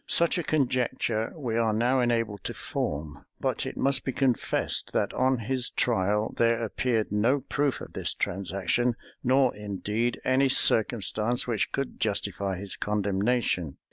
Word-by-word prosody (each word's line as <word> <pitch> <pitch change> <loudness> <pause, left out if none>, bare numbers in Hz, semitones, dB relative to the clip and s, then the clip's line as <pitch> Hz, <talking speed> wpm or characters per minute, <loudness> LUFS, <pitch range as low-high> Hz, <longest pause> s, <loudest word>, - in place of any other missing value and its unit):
Such 170 +1 +2
a - - -1
conjecture 125 -6 0
we 120 -7 -2
are 115 -1 +2
now 120 +4 +2
enabled 115 -5 0
to - - -3
form; 75 0 -4 0.2
but - - -1
it - - -6
must 140 0 +2
be 135 - -1
confessed, 130 -3 0
that - - 0
on 130 +1 +2
his 125 +2 -1
trial 105 -2 +1
there 115 0 +2
appeared 115 -1 0
no 115 +7 +2
proof 140 +1 -1
of - - -9
this - - -1
transaction, 100 +6 0 0.3
nor 130 0 +3
indeed 105 +3 -2
any 130 +1 +3
circumstance 115 0 +2
which 115 -4 -1
could 135 -1 -3
justify 100 -2 -1
his 100 +1 -6
condemnation. 100 - 0
115 Hz, 145 wpm, -27 LUFS, 105-130 Hz, 0.3 s, nor